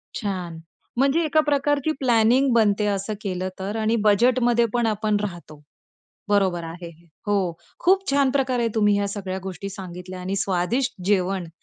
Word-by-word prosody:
छान! 180 -5 -4 0.4
म्हणजे 280 +5 +3
एका 310 +1 +2
प्रकारची 290 +1 +1
प्लॅनिंग 250 +1 +3
बनते 210 -2 +3
असं 200 +2 -3
केलं 185 -3 -3
तर 195 +3 -4
आणि 220 +1 +1
बजेटमध्ये 235 +3 +3
पण 240 -1 +1
आपण 215 0 0
राहतो, 170 -7 -7 0.7
बरोबर 190 -4 +1
आहे 170 +1 -8
हे. 170 +1 -18 0.2
हो, 195 -4 +1 0.3
खूप 385 -1 +2
छान 275 -1 +3
प्रकारे 255 -3 +1
तुम्ही 210 -2 +3
ह्या 200 0 0
सगळ्या 195 -2 -4
गोष्टी 190 0 -6
सांगितल्या 185 -1 -8
आणि 190 +2 -3
स्वादिष्ट 210 +7 0
जेवण 190 -2 0
205 Hz, 150 wpm, -23 LUFS, 185-245 Hz, 0.7 s, म्हणजे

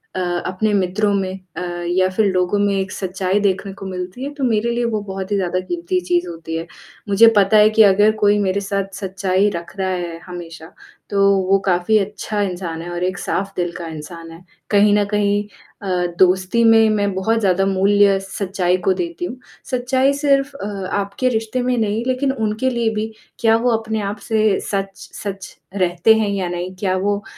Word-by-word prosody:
अ, - - -2 0.3
अपने 200 +4 -1
मित्रों 200 +2 +1
में 190 -1 -2 0.2
अ, - - -3 0.3
या 185 +1 +2
फिर 220 - +3
लोगों 185 +2 +1
में 200 0 +2
एक 190 -1 -2
सच्चाई 190 +1 -1
देखने 195 -1 -1
को 195 - -10
मिलती 185 +6 -6
है 285 - -5
तो 285 -2 -5
मेरे 235 -1 +1
लिए 240 0 -1
वो 220 -3 -1
बहुत 190 0 -6
ही - - +2
ज़्यादा 185 -2 0
क़ीमती 175 0 -2
चीज़ 175 0 0
होती 165 -1 -6
है। 165 +1 -5 0.4
मुझे 210 +3 +6
पता 200 +2 +5
है 210 0 +7
कि 220 0 +5
अगर 205 +1 +5
कोई 205 0 +3
मेरे 200 0 0
साथ 195 0 -3
सच्चाई 190 0 0
रख 170 +1 -7
रहा 190 0 0
है 175 -2 -4
हमेशा 170 -3 -9 0.4
तो 200 -1 +1 0.3
वो 195 - +5
काफ़ी 180 +4 +2
अच्छा 210 +1 -3
इंसान 175 -4 -3
है 175 - -7
और 175 0 -3
एक 185 +1 -1
साफ 195 +1 -2
दिल 175 -1 -1
का 170 -1 -6
इंसान 165 +1 -9
है, 165 +2 -13 0.3
कहीं 205 0 +4
न 205 - +3
कहीं 205 0 +1 0.4
अ, 180 -2 -1
दोस्ती 185 +5 +3
में 225 -1 +6
मैं 205 -2 0
बहुत 225 +4 +1
ज़्यादा 195 -2 +2
मूल्य 195 +1 +3
सच्चाई 190 -2 -1
को 190 - +4
देती 345 - -4
हूँ। 255 - -6 0.3
सच्चाई 260 +2 +2
सिर्फ 280 -1 +2
अ, 200 - -6 0.3
आपके 200 +5 -1
रिश्ते 225 +1 -1
में 250 0 0
नहीं 220 0 0
लेकिन 260 +1 +1
उनके 220 +1 -1
लिए 235 -2 0
भी 220 +1 -2 0.3
क्या 225 -1 +4
वो 240 +1 +1
अपने 220 -1 -3
आप 200 +1 -3
से 215 -3 +2
सच-सच 195 0 -5 0.2
रहते 180 +2 +3
हैं 220 -2 +1
या 195 -2 -1
नहीं? 180 +1 -4
क्या 185 0 -1
वो 205 +2 -1
200 Hz, 195 wpm, -19 LUFS, 185-215 Hz, 0.4 s, है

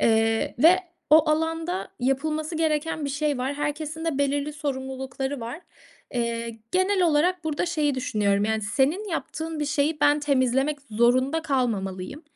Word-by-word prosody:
Eee, 225 0 +2
ve 345 +7 +6 0.3
o 310 0 +6
alanda 325 +3 -1
yapılması 305 +5 -1
gereken 315 -1 0
bir 280 - -2
şey 285 -1 -1
var. 265 +3 -2
Herkesin 300 +2 -3
de 305 -4 -1
belirli 285 +1 0
sorumlulukları 265 -1 -4
var. 240 +9 -6 0.5
Eee, 235 -1 -2
genel 375 +1 +2
olarak 345 +2 +2
burada 315 +2 -1
şeyi 305 -4 +1
düşünüyorum, 205 -5 +1
yani, 220 0 0
senin 285 - 0
yaptığın 320 -2 -4
bir - - +1
şeyi 295 +1 0
ben 290 0 +4
temizlemek 275 +1 +1
zorunda 255 +8 +2
kalmamalıyım. 230 - -2
290 Hz, 140 wpm, -25 LUFS, 255-315 Hz, 0.5 s, ve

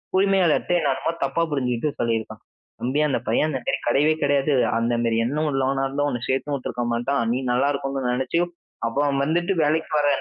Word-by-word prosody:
உரிமையாளர்ட்ட 190 -4 +2
என்ன - - 0
என்னமோ - - -2
தப்பா 170 - -1
புரிஞ்சுகிட்டு 130 +1 -1
சொல்லியிருக்கான். 115 -2 -2 0.4
"தம்பி 130 +5 0
அந்த - - 0
பையன் 155 - +2
அந்த 130 -4 -2
கிடையவே 145 +6 +3
கிடையாது. 145 0 +2 0.3
அந்த 120 +1 0
மாரி 115 -1 +1
எண்ணம் 150 +3 -1
உள்ளவனா 135 0 0
இருந்தா 145 +2 -1
உன்னை 120 -3 -3
சேர்த்து 140 +2 0
உட்டுருக்க 125 -2 -4
மாட்டான். 125 +3 0
நீ - - 0
நல்லா 130 +3 +2
இருக்கணும்னு 135 -2 -2
நினைச்சு 130 +6 0 0.5
அப்ப 115 +4 -3
அவன் 140 -1 +1
வந்துட்டு 175 +5 0
வேலைக்கு 155 +2 +1
போற 150 -1 +2
140 Hz, 175 wpm, -23 LUFS, 125-150 Hz, 0.5 s, கிடையவே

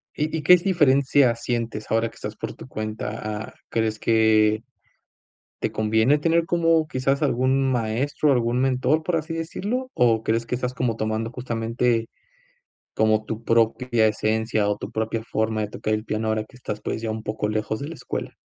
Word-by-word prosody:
¿Y 155 +2 -1
y - - -3
qué 180 +4 +8
diferencia 140 -8 +3
sientes 115 -2 -3
ahora 115 0 +1
que - - -20
estás - - -6
por - - -5
tu - - -12
cuenta? 110 0 -4 0.3
Ah, - - -13 0.2
¿crees 110 -1 -1
que 110 -1 +3 1.0
te - - -1
conviene 110 +6 +3
tener 165 +2 +2
como 165 -2 +2
quizás 135 +1 0
algún 135 0 +2
maestro, 130 +5 +1
algún 120 -1 +1
mentor, 135 +4 +2
por 175 +1 0
así 160 +1 -3
decirlo?, 210 +10 -3
o 120 -2 +4
¿crees 115 +1 0
que - - -2
estás 125 0 -2
como 120 -3 -1
tomando 110 +1 -2
justamente 115 -1 -1 0.9
como 110 0 +2
tu 110 +1 -5
propia 115 0 +2
esencia, 110 0 0
o 105 0 0
tu - - -7
propia 110 0 -2
forma 110 -1 -1
de 105 - -3
tocar 110 0 -2
el 110 +1 -2
piano 110 0 -2
ahora 110 0 0
que 125 - -20
estás, 105 -4 -6
pues 110 - -3
ya 110 - -2
un 110 0 -5
poco 105 0 -2
lejos 110 0 -2
de 140 - -5
la 165 - -7
escuela? - - -5
115 Hz, 180 wpm, -24 LUFS, 110-135 Hz, 1.0 s, qué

